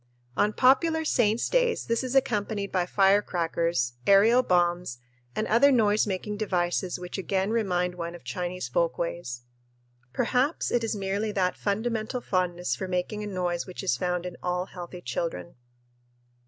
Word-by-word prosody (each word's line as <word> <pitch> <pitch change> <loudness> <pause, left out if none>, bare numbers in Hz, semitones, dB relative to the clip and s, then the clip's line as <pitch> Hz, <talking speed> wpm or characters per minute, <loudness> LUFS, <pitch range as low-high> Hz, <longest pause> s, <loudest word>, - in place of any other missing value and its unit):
On 210 - +2
popular 320 +7 +3
saints' 230 -5 +2
days - - +1
this 230 +2 0
is 255 +1 -3
accompanied 210 -5 0
by 180 -2 0
firecrackers, 170 -9 +1
aerial 215 +5 +6
bombs, 175 - +1 0.4
and 215 - 0
other 280 +6 +5
noise 215 -4 +3
making 205 +2 -3
devices 180 -3 -1
which 180 +2 -6
again 190 +1 -1
remind 180 -6 0
one 170 -1 -5
of 175 - -13
Chinese 175 +5 -4
folkways. 165 -3 -2 0.7
Perhaps 260 - 0
it 240 -1 +1
is 225 0 -1
merely 200 +2 -2
that 185 -2 +1
fundamental 220 +3 -2
fondness 180 - -1
for 185 - -5
making 185 +4 -2
a - - -4
noise 180 -3 -2
which 185 - -7
is 125 - +2
found 180 +5 -2
in 180 -1 -6
all 180 0 -1
healthy 180 -1 -9
children. 125 - -4
190 Hz, 150 wpm, -27 LUFS, 175-220 Hz, 0.7 s, aerial